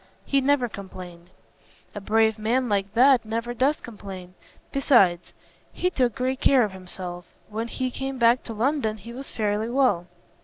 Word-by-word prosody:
"He 275 -1 +2
never 270 -2 +2
complained." 180 -4 -10 0.6
"A 205 - -6
brave 220 +2 +2
man 245 +4 +1
like 200 -2 0
that 260 +1 +5
never 230 +2 -3
does 270 +5 +1
complain. 195 -5 -9 0.4
Besides, 195 - +3 0.4
he 360 - -1
took 250 - +1
great 260 0 -2
care 265 -3 +5
of 210 - -2
himself. 180 -1 -7 0.2
When 220 +2 -3
he 255 +2 -3
came 270 +1 -4
back 235 +1 +4
to 230 - -5
London 225 -1 0
he 230 +4 -10
was 270 +3 -7
fairly 215 +1 -1
well. 240 -9 +2
225 Hz, 160 wpm, -25 LUFS, 200-255 Hz, 0.6 s, that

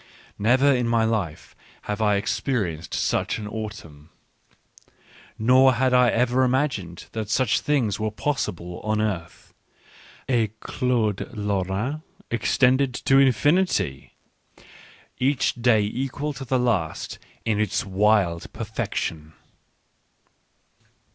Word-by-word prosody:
Never 130 +7 +4
in 125 -2 0
my 115 -1 +2
life 105 -9 -3 0.3
have 105 +1 -3
I 105 -1 +3
experienced 100 - -2
such - - 0
an 105 -2 -6
autumn; 105 -9 -8 1.3
nor 130 +3 +5
had 130 +1 +1
I 125 -1 +5
ever 125 +2 +2
imagined 125 - -1
that 110 -2 -4
such 130 +2 +2
things 120 -9 0
were 110 0 0
possible 90 - -3
on 110 0 -1
earth 95 -6 -4 0.4
— - - -23
a 120 -4 +2
Claude 115 -6 -1
Lorrain 105 +7 -2 0.3
extended 125 +2 +2
to 135 +1 +3
infinity, 135 - +1 1.0
each 135 +1 +1
day 120 -3 +3
equal 135 +7 -3
to 135 0 -8
the 130 +1 +1
last 110 -11 -1 0.3
in 110 -2 +1
its 105 -1 0
wild 95 -3 +1
perfection. 80 -8 -4
110 Hz, 110 wpm, -24 LUFS, 100-130 Hz, 1.3 s, nor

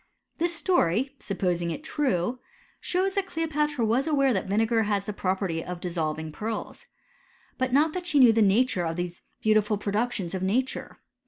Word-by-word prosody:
t 335 - +2
This 340 -1 0
stonr, 265 - +2
supposing 180 -3 -1
it 275 - -5
true, 255 - -1 0.4
shows 375 +2 0
that 390 -1 -1
Cleopatra 300 -6 -1
was 240 +7 +1
aware 275 -4 +3
that 190 - -1
vinegar 225 +3 +2
has 205 -2 0
the 210 - -4
prv^perty 185 -4 -1
of 180 -1 -6
dissolving 160 -3 -3
pearls. 220 +8 -5 0.7
But 255 0 0
not 300 +4 +3
that 360 -1 -4
she 305 - +2
knew 250 -4 +7
the 225 - +3
nature 205 -1 +3
of 165 - -3
these 175 0 -4 0.2
beautiful 215 -1 +3
productions 205 -2 -2
of 190 - -3
nature. 240 +8 -1
220 Hz, 170 wpm, -26 LUFS, 185-275 Hz, 0.7 s, knew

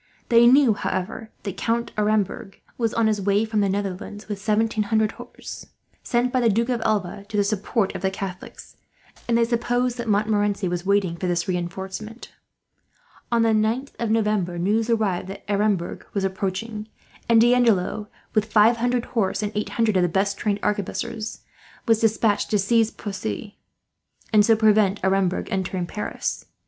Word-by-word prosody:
They 235 0 +6
knew, 260 -2 +6
however, 200 +3 -4
that 200 -4 -5
Count 235 +1 -1
Aremberg 210 -2 -1 0.2
was 230 -2 0
on 230 - +1
his 215 -2 +1
way 200 +2 +2
from 215 -1 0
the 200 - +2
Netherlands, 200 +1 -4
with 205 -2 -5
seventeen 215 +1 +1
hundred 220 0 +1
horse, - - -10 0.3
sent 245 +1 0
by 255 - +3
the 235 -2 +3
Duke 230 +4 +1
of 240 -2 0
Alva 200 -3 -1
to 215 - -3
the 205 - +4
support 205 0 -1
of - - -6
the 190 - +1
Catholics; 190 -1 -8 0.5
and 235 -1 +3
they 235 - +4
supposed 245 +1 0
that 235 - -4
Montmorency 205 -1 +1
was 175 +1 -3
waiting 200 -4 +2
for 185 - -3
this 175 -1 0
reinforcement. 190 +5 -5 1.0
On 235 -1 +3
the 225 - +3
9th 220 +5 0
of 235 - -1
November 210 -5 +1
news 215 +6 +1
arrived 210 -6 0
that 195 +1 -8
Aremberg 200 -3 0
was 200 - 0
approaching, 195 +3 -3 0.4
and 230 -1 +6
D'Andelot, 225 -4 +3 0.3
with 215 0 0
five 225 +2 +5
hundred 245 +1 0
horse 210 -3 -1
and 210 - -2
eight 210 - -2
hundred 225 -3 +1
of - - +3
the 175 - +2
best 195 +3 0
trained 205 -1 -1
arquebusiers, 215 +2 -3 0.5
was 225 -1 +4
despatched 220 -1 +1
to 210 - +2
seize 225 +3 +2
Poissy, 195 - -6 0.7
and 210 -1 +7
so 225 +1 +5
prevent 215 -2 +3
Aremberg 190 -1 +1
entering 185 -1 -2
Paris. 210 +4 -4
210 Hz, 170 wpm, -23 LUFS, 195-225 Hz, 1.0 s, and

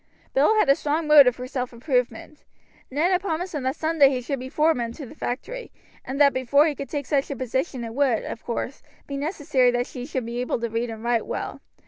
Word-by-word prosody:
Bill 295 +11 +4
had 425 - +4
a 275 - +7
strong 300 +3 -1
motive 285 -5 +7
for 250 - -6
self 255 -1 -3
improvement. 250 +2 -2 0.5
Ned 305 +7 +1
had 365 0 +2
promised 355 -1 -3
him 295 - -2
that 260 +2 -1
some 320 0 -2
day 275 -1 +8
he 260 -2 -1
should 260 +2 -3
be 260 +1 -6
foreman 265 -6 +1
to 285 - -8
the 250 - -11
factory, 390 - -5 0.4
but 265 - -3
that 280 -1 +5
before 260 +3 +3
he 310 - +1
could 275 0 -7
take 285 -2 -3
such 280 -1 0
a 280 - -3
position 260 +1 -2
it 225 -1 -6
would, 260 -4 +2
of 225 - -6
course, 245 +2 -4 0.2
be 280 - -6
necessary 285 -4 +1
that 245 0 0
he 250 0 -7
should 260 -5 -3
be 235 +1 -3
able 250 - -1
to 235 - -1
read 230 +1 -1
and 225 0 -7
write 235 -1 0
well. - - -4
270 Hz, 235 wpm, -24 LUFS, 245-300 Hz, 0.5 s, day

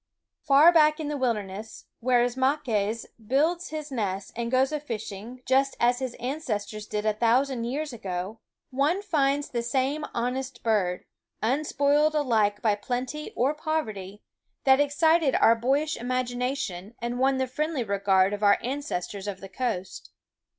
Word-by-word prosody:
Far 290 +5 +6
back 305 -1 +5
in 300 -2 -3
the 295 - -2
wilderness, 215 -4 -3 0.2
w^here 245 -1 +4
Ismaques 245 -4 0 0.2
builds 320 +8 +1
his 305 -1 -6
nest 200 -6 -3
and 235 0 -2
goes 260 +2 +2
a 300 - -1
fishing 230 -2 -7
just 270 +1 +2
as 245 +1 +3
his 260 -2 -4
ancestors 225 -5 -4
did 210 0 -3
a 215 - +3
thousand 240 +3 +1
years 285 +3 -3
ago, 190 0 -5 0.3
one 295 +9 +1
finds 290 -6 +1
the 235 - -2
same 265 +5 -1
honest 250 +1 -3
bird, 195 -6 0 0.4
unspoiled 290 +4 +2
alike 220 -8 +1
by 215 -2 +4
plenty 250 +8 -4
or 265 +5 +2
poverty, 220 - -4 0.4
that 265 0 +5
excited 290 0 +3
our 225 - +6
boyish 275 +7 0
THE - - -5
WOODS - - -8
imagination 245 -5 -2
and 240 +1 -4
won 265 +1 +3
the 260 - +1
friendly 295 +1 -2
regard 195 -2 +2
of 205 - -4
our 205 -1 +5
ancestors 210 -7 -4
of 195 -2 -4
the 195 - -10
coast. 190 -7 -4
250 Hz, 155 wpm, -26 LUFS, 215-285 Hz, 0.4 s, Far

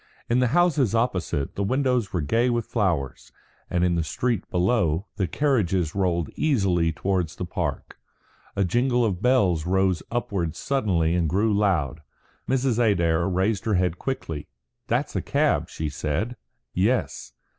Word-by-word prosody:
In 120 - +4
the 125 - +3
houses 145 - +2
opposite, 90 - -1
the 100 - -2
windows 125 -1 +1
were 90 - -1
gay 115 - +1
with 120 -2 0
flowers; 85 - -2 0.4
and 90 0 0
in 90 - +2
the 85 -1 0
street 115 +6 -2
below, 90 -2 +1
the 95 -4 0
carriages 95 - +1
rolled 90 -5 0
easily 95 - +2
towards 90 -1 -1
the 90 - -4
Park. 85 - -4 0.6
A 100 - +2
jingle 120 +5 +2
of 95 -4 -2
bells 95 -11 +2
rose 95 -2 +2
upwards 100 -9 -2
suddenly 95 -12 +1
and 85 -3 +1
grew 105 +5 +2
loud. 85 -8 +1 0.5
Mrs. 130 -2 +1
Adair 85 -6 +2
raised 95 +3 0
her 110 -3 +1
head 90 -1 0
quickly. 80 - -4 0.4
"That's - - -1
a - - 0
cab," - - +1
she 80 - -4
said. 75 - -2 0.4
"Yes." 95 - 0
95 Hz, 150 wpm, -25 LUFS, 85-120 Hz, 0.6 s, In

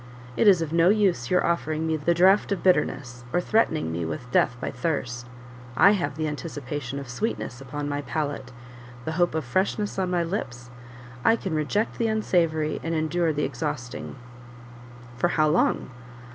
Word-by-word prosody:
It - - +3
is 185 -5 +6
of 160 0 -5
no 170 +1 +5
use 190 - +2
your 180 - +3
offering 160 -2 0
me 160 0 +1
the 155 +3 +1
draught 190 +5 +4
of 200 - -1
bitterness, 130 -9 +1
or 175 - +2
threatening 175 - +1
me 85 +1 -2
with 80 +10 -5
death 125 - +3
by - - -3
thirst: 125 -3 -3 0.5
I 200 - +7
have 170 -9 -1
the 155 -1 -1
anticipation 145 -3 -5
of 140 -1 -6
sweetness 125 - -3
on 145 0 -3
my 145 0 -2
palate; 145 -4 -3 0.5
the 160 - -2
hope 175 0 +1
of 160 -4 -1
freshness 195 - -1
on 185 -1 0
my 175 -1 +1
lips; 120 - -5 0.5
I 225 - +5
can 190 -6 -4
reject 155 +9 -1
the 230 - +2
unsavoury, 165 -8 +1
and 165 0 -2
endure 160 +1 +1
the 150 0 -1
exhausting." 145 -6 -4 1.0
"For 175 - +3
how 155 -3 +2
long?" 150 -4 +1
155 Hz, 175 wpm, -25 LUFS, 140-180 Hz, 1.0 s, I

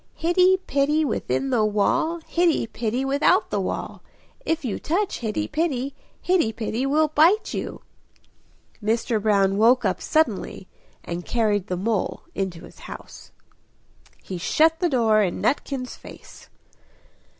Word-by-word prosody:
Hitty 365 +3 +3
Pitty 295 +3 +1
within 135 - -1
the 220 - +2
wall, 215 +11 +1
Hitty 340 -5 +1
Pitty 230 +3 -2
without 280 +2 +2
the - - 0
wall; - - -4 0.4
If 325 -3 -1
you 225 - -2
touch 370 +6 -1
Hitty 235 +6 -2
Pitty, 280 -4 -1 0.3
Hitty 345 -12 +2
Pitty 230 +4 -2
will 305 +2 +2
bite 330 +8 +3
you!" - - -5 1.0
Mr. 225 0 0
Brown 200 -2 +2
woke 245 +2 +4
up 190 - 0
suddenly 230 -10 0 0.4
and 175 +1 -5
carried 210 -4 0
the 180 - -2
mole 210 +2 -2
into 190 -4 -4
his - - -14
house. - - -11 0.9
He 185 -2 -6
shut 320 - +2
the 350 -1 +1
door 225 -6 +3
in 185 -4 -1
Nutkin's 270 -3 -2
face. - - -14
245 Hz, 135 wpm, -23 LUFS, 210-315 Hz, 1.0 s, woke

